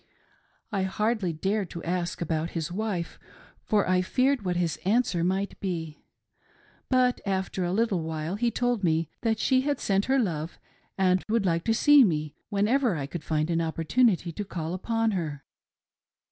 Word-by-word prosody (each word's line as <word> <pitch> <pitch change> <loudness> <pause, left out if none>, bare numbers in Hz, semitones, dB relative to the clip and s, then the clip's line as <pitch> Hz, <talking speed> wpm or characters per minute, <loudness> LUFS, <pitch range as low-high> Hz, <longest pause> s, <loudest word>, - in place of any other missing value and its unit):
I 200 -3 0
hardly 205 0 0
dared 195 +4 -1
to 170 - -7
ask 175 0 -2
about 160 0 -1
his 165 +1 -3
wife, 190 -3 -3 0.4
for 210 -2 +1
I 185 0 +3
feared 255 +7 +1
what 180 -2 -1
his 170 -3 0
answer 200 -4 +1
might 190 +3 -1
be; 165 -5 -4 0.9
but 255 -1 +2
after 190 -1 -2
a 175 - -1
little 205 -3 +1
while 160 +1 -3
he 235 +4 +1
told 245 -3 -1
me 160 -2 +1
that 225 -1 +1
she 260 +4 +2
had 285 +1 -1
sent 195 0 +1
her 270 +1 +2
love 170 - -2 0.4
and 185 -1 +2
would 220 -2 +1
like 170 -2 0
to 225 - +3
see 290 +3 +7
me 155 -7 0 0.2
whenever 215 +2 +2
I 145 -3 -3
could 155 +3 -6
find 155 +1 0
an 165 0 +1
opportunity 170 +4 +1
to 205 - -4
call 170 -4 -4
upon 225 +4 0
her. 155 -7 -3
190 Hz, 170 wpm, -27 LUFS, 165-220 Hz, 0.9 s, see